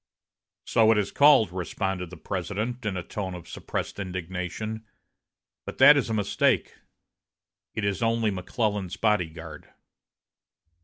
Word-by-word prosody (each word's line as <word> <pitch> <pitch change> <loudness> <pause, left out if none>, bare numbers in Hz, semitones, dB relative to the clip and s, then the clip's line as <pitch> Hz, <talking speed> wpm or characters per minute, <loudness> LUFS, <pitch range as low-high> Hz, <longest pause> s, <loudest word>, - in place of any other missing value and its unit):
"So 110 -1 +4
it 110 - +3
is 100 -1 0
called," 140 -9 +5
responded 90 0 -3
the 90 - -10
President, 105 +7 -4
in 95 -3 -2
a 90 - -4
tone 95 -1 -5
of 85 - -10
suppressed - - -5
indignation, 95 +4 -4 0.8
"But - - -8
that 150 - +9
is 140 -5 0
a - - -1
mistake. 105 -2 +1 1.0
It 105 - -1
is 100 -2 -1
only 115 -1 +1
McClellan's 100 0 -2
body 105 -6 +2
guard." 80 - -11
100 Hz, 135 wpm, -26 LUFS, 90-110 Hz, 1.0 s, that